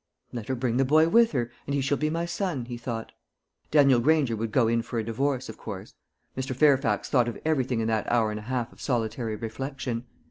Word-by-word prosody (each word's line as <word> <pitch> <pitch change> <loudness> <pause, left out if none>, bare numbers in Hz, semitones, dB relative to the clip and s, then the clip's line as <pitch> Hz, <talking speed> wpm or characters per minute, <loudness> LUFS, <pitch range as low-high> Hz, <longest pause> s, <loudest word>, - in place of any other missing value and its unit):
"Let 115 -3 -5
her 130 - -1
bring 120 -1 -1
the 135 - +4
boy 155 +4 +4
with 230 +4 +5
her, 120 -3 -1 0.2
and 140 - -1
he 140 - +1
shall 140 +2 +1
be 155 - +1
my 165 +2 -1
son," 170 - -2
he 120 0 -6
thought. 115 -2 -5 0.6
Daniel 140 -4 +5
Granger 140 -2 +3
would 110 0 -3
go 120 -1 +3
in 115 0 +2
for 120 +1 -5
a 115 - 0
divorce, 130 +4 -1
of 110 - -9
course. 100 -1 -7 0.4
Mr. 130 0 -3
Fairfax 135 -6 +3
thought 125 -3 +3
of 120 - -4
everything 130 -7 +1
in 110 - -1
that 110 -2 0
hour 115 -3 +2
and 105 - -4
a 105 +3 -10
half 120 -2 -2
of - - -16
solitary 115 -3 -1
reflection. 125 +1 -4
125 Hz, 225 wpm, -27 LUFS, 115-140 Hz, 0.6 s, with